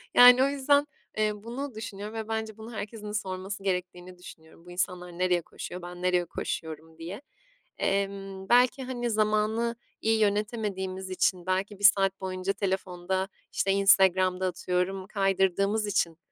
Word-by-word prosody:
Yani 250 +1 +9
o - - +4
yüzden, 285 +1 +2 0.3
eee, 215 0 +2
bunu 250 +2 -5
düşünüyorum 210 -1 -6
ve 220 -1 -4
bence 220 -1 -3
bunu 220 +2 -9
herkesin 210 0 -6
sorması 195 -1 -4
gerektiğini 180 -1 -3
düşünüyorum. 165 -1 -14
"Bu 180 - -11
insanlar 180 -1 -3
nereye 180 -1 +2
koşuyor, 180 +2 -8
ben 175 0 -9
nereye 180 -1 +2
koşuyorum?" 160 -1 -5
diye. 175 +9 -7 0.6
Emm, 195 -1 -2
belki, 250 +2 +4
hani, 245 -2 -3
zamanı 215 +2 +1 0.3
iyi 225 0 +2
yönetemediğimiz 205 -3 -1
için 185 -1 0
belki 190 +2 -1
1 - - -11
saat 195 -2 +5
boyunca 185 +1 -2
telefonda, 190 -1 -2 0.2
işte, 195 - +1
Instagram'da 190 -2 +4
atıyorum 185 +1 -2
kaydırdığımız 195 +1 +1
için, 175 -5 0
195 Hz, 140 wpm, -28 LUFS, 185-215 Hz, 0.6 s, Yani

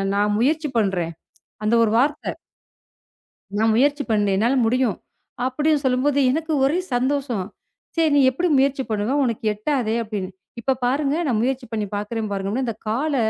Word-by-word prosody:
நான் 205 +1 +2
முயற்சி 300 +6 +1
பண்றேன். 190 -6 0 0.5
அந்த 215 +2 +1
ஒரு 220 - +2
வார்த்த. 290 +5 0 1.3
நான் 220 0 +3
முயற்சி 285 +3 +2
பண்ணேன். 205 -2 +2
என்னால 235 +6 +2
முடியும் 245 -3 +1 0.5
அப்டின்னு 295 +3 +1
சொல்லும்போது, 260 +3 +2
எனக்கு 320 +3 -1
ஒரே 295 +6 +2 0.2
சந்தோஷம். 255 -5 0 0.5
சரி 325 -2 +3
நீ 285 - +5
எப்டி 345 +7 0
முயற்சி 275 0 +1
பண்ணுவ? 215 +5 0
உனக்கு 230 -3 -2
எட்டாதே 225 +1 -1
அப்டின்னு. 205 -4 -5 0.3
இப்ப 265 +3 +1
பாருங்க 275 +3 +1
நான் 235 -5 +1
முயற்சி 260 +1 -1
பண்ணி 215 -2 -1
பாக்குறேன் 210 +1 -3
பாருங்க. 200 +6 -2
இந்தக் 225 -2 -5
கால 280 +7 0
250 Hz, 150 wpm, -22 LUFS, 215-280 Hz, 1.3 s, நீ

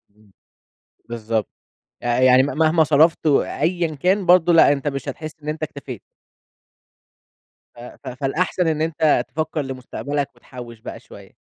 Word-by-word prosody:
إمم، 105 -1 -25 0.8
بالضبط، 110 -2 -2 0.6
ي - - -8 0.2
يعني 130 0 +6
مهما 160 +3 +2
صرَفت 155 +2 +3
و 145 - +4
أيًا 165 0 -2
كان، 185 +6 +1
برضو 175 -1 +5
لأ 165 -3 +6
أنت 140 +1 -5
مش 135 0 -3
هتحس 155 +3 -7
إن 150 - -4
أنت 155 +1 -4
اكتفيت. 140 -7 -7 1.7
ف - - -15
ف 120 - -12
فالأحسن 150 +7 -1
إن 155 -1 0
أنت 160 -1 +1
تفكَّر 155 0 -3
لمستقبلك 140 +2 -4
وتحوّش 120 -3 -11
بقى - - -9
شوية. - - -15
145 Hz, 140 wpm, -21 LUFS, 130-160 Hz, 1.7 s, يعني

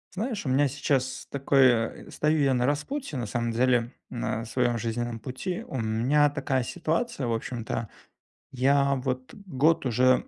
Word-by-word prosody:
Знаешь, 215 - -3
у - - -1
меня 140 +3 +3
сейчас 130 -1 -1
такое, 130 -4 +2
стою 155 +1 +1
я 135 -1 +3
на 125 0 +1
распутье, 150 - -2
на 120 - -2
самом 115 +2 -2
деле, 120 0 +2 0.2
на 115 -2 -2
своем 120 0 0
жизненном 115 +1 -3
пути. 130 - -4
У 130 - -4
меня 120 +7 +3
такая 135 -2 -1
ситуация, 165 - -2
в 115 - 0
общем-то, 115 -1 -3 0.6
я 140 +2 +3
вот 130 -1 -3
год 160 -6 +1
уже, 130 +2 +3
130 Hz, 150 wpm, -27 LUFS, 120-145 Hz, 0.6 s, меня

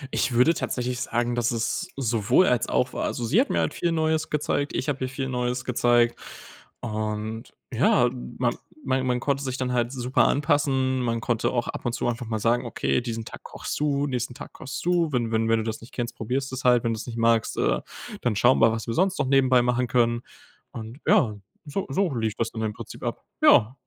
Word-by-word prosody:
Ich - - +1
würde 125 +7 +4
tatsächlich 125 -4 -3
sagen, 120 +1 -1
dass 120 -1 +1
es 115 0 -1
sowohl 120 - +3
als 125 -6 +1
auch 125 0 +1
war. - - -2
Also, 120 - -2
sie 160 - +4
hat 275 - -1
mir - - 0
halt - - -1
viel 175 - -1
Neues 160 -1 0
gezeigt, 145 -1 -1
ich - - -2
habe 140 -3 -1
ihr 130 - -2
viel 135 0 -4
Neues 125 -1 -2
gezeigt. 120 -1 +2 0.6
Und 110 +1 -4 0.2
ja, 120 0 +3 0.3
man 120 -2 +1 0.3
man 130 0 0
man 125 -1 +1
konnte 140 +2 0
sich 130 -1 -3
dann 125 -1 -2
halt 120 -1 0
super 130 -1 +2
anpassen. 135 -2 +1
Man 115 -1 0
konnte 115 0 0
auch 120 -1 -1
ab - - -5
und 120 - 0
zu - - -1
einfach 120 0 -3
mal 110 -1 -1
sagen: 115 +3 +1
„Okay, 120 - 0
diesen 115 -2 -4
Tag - - -10
kochst - - -6
du, 145 -1 +1
nächsten 125 -3 -3
Tag - - -10
kochst 135 - -7
du. 175 -3 +2
Wenn 120 -4 0
wenn 115 0 +1
wenn 115 - +4
du 110 - -1
das 110 0 -4
nicht 115 - -14
kennst, 120 -2 -3
probierst 130 +4 -2
du - - -4
es 125 - -6
halt. 125 -2 +4
Wenn 115 - 0
du 110 - -4
es - - -7
nicht 115 -1 -6
magst, 115 -1 +2
äh, - - +2 0.4
dann 120 -3 0
schauen 120 +5 +4
wir, 115 0 +6
was 110 0 -3
wir 115 - -3
sonst 190 +6 +1
noch - - 0
nebenbei 130 -2 +4
machen 125 0 +1
können.“ 120 -1 +2 0.5
Und 115 +4 -8
ja, 110 -5 +4 0.3
so 155 +6 -3
so 170 +2 0
lief 110 -3 -1
das 115 0 -1
dann 110 - -5
im 110 -1 -1
Prinzip - - -10
ab. - - -4 0.2
Ja. 115 +4 +5
125 Hz, 230 wpm, -25 LUFS, 115-135 Hz, 0.6 s, wir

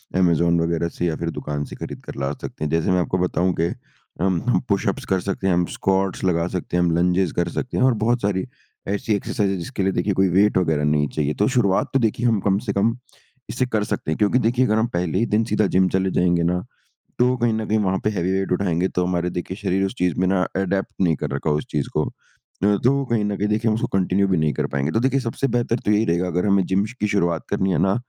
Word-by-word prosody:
Amazon 85 -2 +3
वगैरह 85 0 0
से 90 - -1
या 80 -2 0
फिर 85 - -3
दुकान 75 0 -3
से - - -9
खरीद - - -6
कर - - -8
ला 70 - 0
सकते - - -6
हैं। 75 - -2
जैसे 80 +2 +1
मैं 90 - +3
आपको 90 +1 0
बताऊँ 90 0 +1
कि 85 - +2 0.5
हम 95 -2 +1
हम 125 - +3
पुशअप्स 100 -1 0
कर 95 - +3
सकते 95 0 -1
हैं 95 - +3
हम 90 0 +2
स्कॉट्स 95 0 0
लगा 85 -2 +1
सकते 90 -1 -2
हैं 90 - +3
हम 85 - +2
लंजेस 90 0 +2
कर 85 - +1
सकते 125 - -4
हैं। - - +3
और 130 -1 +5
बहुत 120 +1 +2
सारी 95 -2 0 0.4
ऐसी 100 +2 -1
एक्सरसाइज़ 100 0 -1
है 95 - -1
जिसके 90 +3 -4
लिए 95 - +2
देखिए 95 +4 0
कोई 95 +1 +3
वेट 100 +4 +3
वगैरह 80 -5 +1
नहीं 75 0 +2
चाहिए 75 -1 0
तो 105 - +3
शुरुआत 100 -6 +2
तो 135 - +3
देखिए 115 0 0
हम 110 -3 +2
कम 95 0 +2
से 100 - 0
कम 110 +4 +1 0.5
इसे 130 +1 0
कर 110 -4 -1
सकते 90 - -3
हैं। 80 - -1
क्योंकि 105 +4 +3
देखिए 120 +2 +2
अगर 110 -2 +1
हम 110 +1 +2
पहले 90 +1 0
ही 115 - +2
दिन 110 - +3
सीधा 105 -1 +3
जिम 95 0 +4
चले 95 0 0
जाएँगे 90 -1 +2
ना 90 +2 0 0.6
तो 125 +1 +3
कहीं 120 -1 +1
न 110 0 -2
कहीं 110 - +1
वहाँ 95 -2 +1
पे 105 - +2
हेवी 95 -3 -1
वेट 95 -1 -1
उठाएँगे 90 -1 +1
तो 90 - +2
हमारे 90 -1 -1
देखिए 90 +1 -5
शरीर 95 -1 0
उस 95 - -5
चीज़ 90 -3 +1
में 95 - +2
ना 95 -1 +2
अडैप्ट 95 0 -1
नहीं 85 -4 +3
कर 75 - -4
रखा 70 +3 -2
हो 75 - +2
उस 75 - -4
चीज़ 75 -3 -1
को। 75 - +2 0.6
न 100 0 +4
तो 140 +2 +3
कहीं 115 -3 +1
न 105 -1 -1
कहीं 105 - -1
देखिए 110 +2 +1
हम 110 - +2
उसको 110 - -1
कंटिन्यू 95 +1 +2
भी 95 - +2
नहीं 75 -1 +1
कर - - -1
पाएँगे। 70 +2 0
तो 110 - +1
देखिए 135 +2 +2
सबसे 120 +2 -2
बेहतर 120 -1 0
तो - - +3
यही 105 +1 +3
रहेगा 85 +1 +1
अगर 90 +2 -1
हमें 100 -2 +3
जिम 95 +2 +1 0.2
की 105 - +2
शुरुआत 85 -5 0
करनी 95 0 +1
है - - +1
ना 95 0 +3
95 Hz, 265 wpm, -22 LUFS, 85-105 Hz, 0.6 s, और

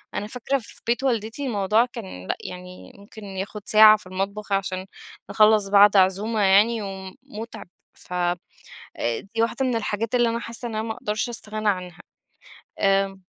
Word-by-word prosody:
أنا 205 - -3
فاكرة 250 +4 -1
في 230 -1 -13
بيت 240 +3 +1
والدتي 235 +1 -1
الموضوع 215 +1 +2
كان 190 - -9
لأ - - -1
يعني 180 0 -10
ممكن 210 +2 -13
ياخد 195 +2 -6
ساعة 215 0 +8
في 210 - -15
المطبخ 195 +3 -4
عشان 190 -1 -1 0.4
نخلَّص 210 0 +4
بعد 205 0 +6
عزومة 200 +4 +2
يعني، 210 +4 +4
ومُتعب 205 +3 -8 0.3
ف - - -10
أ 175 0 +1 1.0
دي 225 - +1
واحدة 235 +3 0
من 250 -2 0
الحاجات 225 +1 -2
اللي 240 -1 +3
أنا 230 0 -2
حاسّة 235 +1 -5
إن 225 - -6
أنا 215 - -1
ما 220 - -2
اقدرش 215 +2 -3
أستغنى 215 -2 -3
عنها، 180 -3 -3 0.8
آآ 195 0 +2
210 Hz, 160 wpm, -24 LUFS, 195-230 Hz, 1.0 s, ساعة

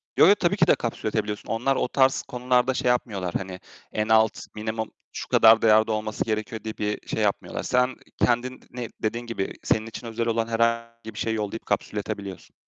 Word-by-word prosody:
Yo, - - +7
yo, 200 - +7
tabii 185 0 +1
ki 175 -2 +4
de - - +6
kapsülletebiliyorsun. 110 -2 -3
Onlar 125 +4 +1
o - - 0
tarz 130 0 +3
konularda 125 +1 +1
şey 125 - 0
yapmıyorlar. 100 -8 -1
Hani 95 -1 -7 0.3
en 105 0 0
alt, 110 0 +5 0.2
minimum 110 +1 -3 0.2
şu - - -5
kadar 110 0 +6
değerde 110 0 +5
olması 110 0 -2
gerekiyor 110 0 -3
diye 110 -1 -6
bir 105 0 -3
şey 110 - -1
yapmıyorlar. 100 - -1
Sen 125 0 +2 0.2
kendin 125 +1 +1
ne 120 -2 -5 0.2
dediğin 115 +2 -1
gibi 115 -5 -3
senin 110 - +1
için 115 +1 -8
özel 115 +1 -2
olan 115 0 0
herhangi 115 0 -1
bir 105 - -8
şeyi 110 0 0
yollayıp 105 +1 -4
kapsülletebiliyorsun. 100 -2 -4
115 Hz, 185 wpm, -25 LUFS, 110-120 Hz, 0.3 s, Yo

